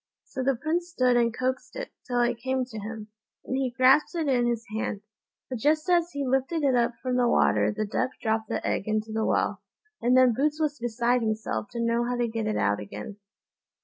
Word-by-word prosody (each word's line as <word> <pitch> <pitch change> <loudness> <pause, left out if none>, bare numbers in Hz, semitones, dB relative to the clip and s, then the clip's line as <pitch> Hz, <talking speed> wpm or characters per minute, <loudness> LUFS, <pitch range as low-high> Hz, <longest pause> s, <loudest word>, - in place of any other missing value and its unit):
So 265 - -6
the 270 +1 +2
Prince 325 +7 -2
stood 255 -7 +2
and 235 -1 +3
coaxed 255 +1 -3
it, - - -5 0.2
till 245 -1 +1
it 240 -1 +1
came 260 0 0
to 225 -3 -8
him, 215 +1 -7 0.4
and 260 - -2
he 265 -1 0
grasped 260 +7 +4
it 325 -3 -1
in 245 -3 +2
his 235 -1 -1
hand; 215 -2 -2 0.5
but 255 -3 -5
just 305 - +2
as 345 -1 +3
he 285 -1 -2
lifted 270 +5 0
it 275 -2 +3
up 240 -1 +2
from 255 -1 0
the 245 -1 +3
water - - +3
the 215 0 -2
duck 215 +4 -1
dropped 220 -1 -1
the - - -2
egg 200 - -1
into 215 0 -1
the 220 0 0
well, - - 0 0.4
and 250 +2 +4
then 255 -2 +6
Boots 295 +5 0
was 300 -3 -1
beside 240 +1 +1
himself 220 -1 -2
to 235 - -4
know 235 0 +1
how 245 +1 -1
to 240 -1 0
get 225 -1 -3
it 215 - 0
out 105 0 +1
again. 105 - -8
245 Hz, 220 wpm, -27 LUFS, 225-265 Hz, 0.5 s, then